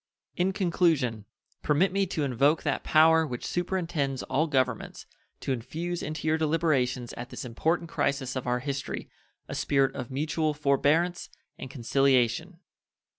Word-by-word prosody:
In 180 +2 +1
conclusion 160 - +1 0.4
permit 165 +6 +2
me 195 0 +1
to 160 -3 -2
invoke 140 +4 +2
that - - -1
Power 160 +1 +5
which 125 -3 -5
superintends 170 -7 -2
all 145 +5 0
governments 130 -5 -1 0.4
to - - -2
infuse 165 +8 -4
into 155 +1 -4
your 160 +1 +2
deliberations 150 -6 0
at 120 +1 -7
this - - -7
important 160 +8 -1
crisis 135 -4 -1
of 130 -1 -4
our 125 0 0
history 140 0 -4 0.4
a - - -6
spirit 135 -1 +1
of 125 - -5
mutual 155 +3 -1
forbearance 150 +5 +1 0.3
and 130 - -7
conciliation. 135 +6 +1
145 Hz, 140 wpm, -28 LUFS, 130-165 Hz, 0.4 s, Power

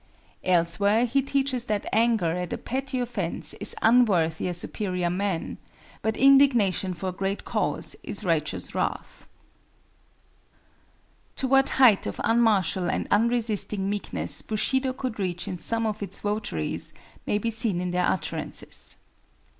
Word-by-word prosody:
Elsewhere 185 +6 +2
he 260 +3 +1
teaches 270 -3 -1
that 210 -3 -2
anger 225 -7 +2
at 180 -1 -4
a - - -2
petty 265 0 -3
offense 230 -8 +1
is - - +3
unworthy 195 -10 +3
a 180 - -2
superior 180 -1 -2
man, 190 -2 -2 0.4
but 220 0 -1
indignation 245 -9 +4
for 185 +2 -4
a - - -3
great 195 +2 -3
cause - - -1
is - - -6
righteous - - -1
wrath. - - -4 2.1
To 265 - +2
what 270 +1 +4
height 245 -7 +5
of - - -5
unmartial 215 -6 +2
and - - -2
unresisting 215 -3 +1
meekness 90 - -3
Bushido 260 +5 0
could 255 -4 -5
reach 180 -3 -3
in 180 - -5
some 230 +4 -1
of 215 -1 -3
its 200 -1 -4
votaries, 205 - -3 0.3
may 205 - +1
be 230 +2 -2
seen 220 -5 0
in 180 0 -2
their 180 0 +1
utterances. 190 - -4
210 Hz, 140 wpm, -26 LUFS, 180-240 Hz, 2.1 s, height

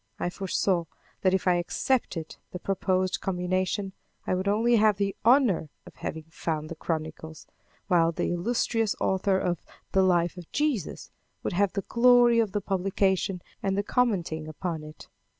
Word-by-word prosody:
I 175 - -2
foresaw 185 -2 0 0.4
that 190 0 +3
if 190 - -2
I 180 -1 +4
accepted 175 -2 -1
the - - -4
proposed 185 0 0
combination, 185 +1 -1 0.3
I - - 0
would 185 +2 -1
only 230 +4 +3
have 215 -2 +4
the 200 -1 -1
honor 230 - +4 0.2
of - - -14
having 160 0 -5
found 155 -1 -3
the 165 - -6
chronicles, 160 0 -5 0.4
while 170 -3 +4
the 170 - -1
illustrious 225 +3 0
author 190 0 +1
of 175 -3 -1 0.3
the 190 - +4
"Life 175 -1 +2
of 175 -2 -10
Jesus" 290 - -1 0.3
would - - -2
have 200 +1 +2
the 200 - -2
glory 240 +1 +5
of 220 -4 +1
the 205 - -1
publication 190 -1 0 0.2
and 195 0 0
the 200 - +1
commenting 185 -10 0
upon 160 +1 -4
it. 155 0 -11
185 Hz, 160 wpm, -27 LUFS, 175-205 Hz, 0.4 s, glory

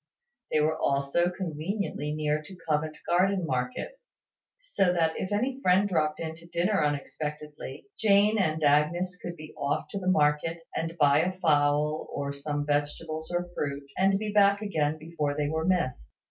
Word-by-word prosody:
They 155 - +3
were 155 +1 +1
also 140 +5 +1
conveniently 175 -2 -3
near 150 0 0
to 180 +5 -12
Covent 155 0 0
Garden 185 +1 +2
market; 130 - -3 0.6
so - - +1
that, 165 -2 +1
if 190 - -4
any 255 +6 -1
friend 185 0 +4
dropped 155 -5 0
in 160 -1 -4
to 170 +1 -15
dinner 175 +1 +1
unexpectedly, 150 -1 -4
Jane 210 0 +4
and 160 -4 0
Agnes 155 +5 +2
could 175 - -5
be 155 -2 -11
off 140 +1 -1
to 200 - -3
the 185 - -5
market, 155 0 +2
and 165 +1 -3
buy 145 -2 +5
a 180 +4 +1
fowl, 150 -2 +2
or 140 0 -3
some 145 +1 -3
vegetables 150 +2 -2
or 175 0 -1
fruit, 140 -2 -3
and 195 +1 +3
be 210 +1 -3
back 200 -1 +5
again 155 -6 0
before 155 -2 -3
they 150 -1 +1
were 160 +1 -1
missed. 150 - 0
160 Hz, 165 wpm, -28 LUFS, 150-185 Hz, 0.6 s, buy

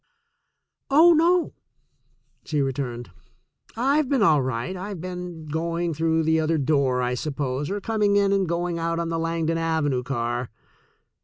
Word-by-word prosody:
"Oh, 320 +5 +7
no," 340 +2 +2 0.9
she 150 -2 -2
returned; 130 -3 -3 0.7
"I've 275 +3 +2
been 270 -6 +2
all 155 -7 +4
right. 130 +5 -3
I've 190 0 -6
been 180 -2 -7
going 165 +2 -2
through 160 +1 +1
the 160 0 +2
other 160 +1 +1
door, 135 -3 +1
I 125 0 0
suppose, 140 +1 -3
or 205 - -2
com 220 +1 -3
ing 205 -1 +3
in 200 -1 +3
and 195 -3 +1
going 170 0 -1
out 165 0 -1
on 170 0 -2
the 165 0 -2
Langdon 165 0 -1
Avenue 160 -5 0
car." 120 -1 -3
165 Hz, 155 wpm, -24 LUFS, 140-185 Hz, 0.9 s, Oh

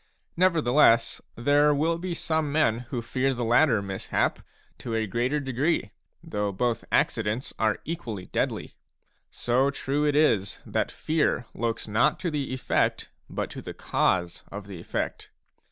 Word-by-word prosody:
Nevertheless, 150 -9 +4
there 145 +4 +4
will 165 +3 +1
be 175 -1 -3
some 160 -3 -1
men 125 -6 +1
who 120 -4 -3
fear 130 +3 0
the 120 - -2
latter 120 -2 +4
mishap 95 -1 -1 0.4
to 115 -2 -4
a 110 -1 +1
greater 120 +8 0
degree, 135 -3 0 0.3
though 105 -1 -2
both 115 +3 -1
accidents 115 +3 0
are 110 -1 +2
equally 120 - -5
deadly; - - -2 0.6
so 130 +3 +1
true 140 +1 -1
it 145 - +1
is 110 -10 +2
that - - -1
fear 155 -5 0
looks 115 -1 -2
not 110 +3 +2
to 175 -3 -1
the 145 -3 -2
effect, 130 0 0 0.2
but - - -3
to - - -7
the - - -8
cause 85 -2 0
of 100 0 -7
the 100 -4 -8
effect. - - -4
125 Hz, 150 wpm, -26 LUFS, 110-150 Hz, 0.6 s, Nevertheless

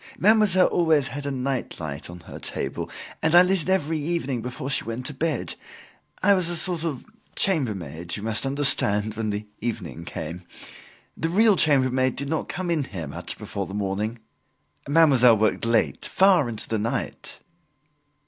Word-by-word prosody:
Mademoiselle 205 -3 +5
always 155 -5 +2
had 145 0 -5
a - - -1
nightlight 125 - -4
on 90 0 -10
her - - -10
table, - - -3 0.3
and 160 +2 +3
I 175 - +9
lit 185 0 +3
it 170 - -2
every 165 -4 +1
evening 145 -6 -2
before 125 +3 -5
she - - +2
went 115 +3 -5
to 150 - -2
bed. 150 -1 -2 0.7
I 200 +1 +6
was 185 -3 +1
a 175 - -2
sort 170 -1 -1
of 150 -7 -4 0.3
chambermaid, 95 - -1
you 105 - -5
must 110 -1 0
understand, 120 -7 +2
when 110 -1 -3
the 105 +1 -3
evening 100 -8 -5
came. 85 +1 -6 0.7
The 165 - -2
real 210 +4 +4
chambermaid 130 -5 +3
did 140 +1 -3
not 160 - -2
come 185 -1 -4
here 135 - -2
much 70 - -6
before 100 -2 -5
the 95 - -7
morning. 105 +3 -2 0.7
Mademoiselle 135 -7 +6
worked 110 +1 +1
late 115 -1 +1
far 185 -9 +4
into 110 -2 -5
the 110 - -1
night." 115 +3 -4
135 Hz, 165 wpm, -24 LUFS, 110-165 Hz, 0.7 s, I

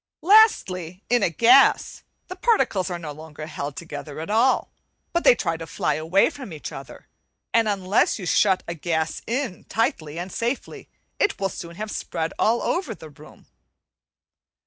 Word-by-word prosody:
Lastly, 195 - +4
in 245 -2 +4
a 195 - +2
gas 235 - +4 0.3
the 370 - -7
particles 365 - +1
are 175 - -3
no 160 -3 -7
longer 155 0 -9
held 145 -2 -6
together 155 -1 -8
at 165 +6 -5
all, 235 +4 +2 0.4
but 340 - +1
they - - +7
try 165 -7 -2
to 165 0 -8
fly - - -1
away 165 - +2
from 265 - -9
each 155 -2 -7
other; - - -10 0.5
and 230 -2 +3
unless 195 0 +1
you 195 - -7
shut 190 +1 +3
a 170 - -3
gas 160 -1 -2
in 240 -5 -3
tightly 170 - -2
and 180 +2 -5
safely, 240 +7 -4 0.3
it 410 - +1
will 195 - 0
soon 170 -2 -8
have 215 +3 -5
spread 160 0 -3
all 230 +2 +2
over 310 - -1
the 160 - -12
room. 150 +1 -16
185 Hz, 170 wpm, -23 LUFS, 160-235 Hz, 0.5 s, they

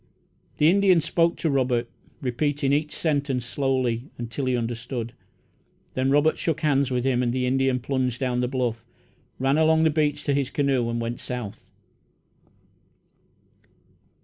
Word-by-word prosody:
The 150 - +4
Indian 190 0 +5
spoke 165 +1 +1
to 165 - 0
Robert, 125 -3 +1 0.4
repeating 140 +2 0
each 150 +1 0
sentence 140 -5 -1
slowly, 130 -1 -1
until 120 +3 -4
he 130 -1 +1
understood. 120 0 -4 0.8
Then 130 +1 0
Robert 145 +3 +3
shook 165 -3 -1
hands 140 -3 +2
with 125 -1 -1
him, 130 -2 +2
and 120 -1 +1
the 125 +1 0
Indian 130 0 +1
plunged 125 -1 -1
down 125 -2 0
the 125 - +1
bluff, 120 -3 -2 0.5
ran 135 +3 +2
along 160 0 +4
the 160 - +4
beach 150 -1 0
to 145 - +1
his 140 -1 0
canoe, 135 -5 +1
and 115 0 -2
went 115 +1 -3
south. 125 -5 -6
135 Hz, 150 wpm, -25 LUFS, 125-145 Hz, 0.8 s, Indian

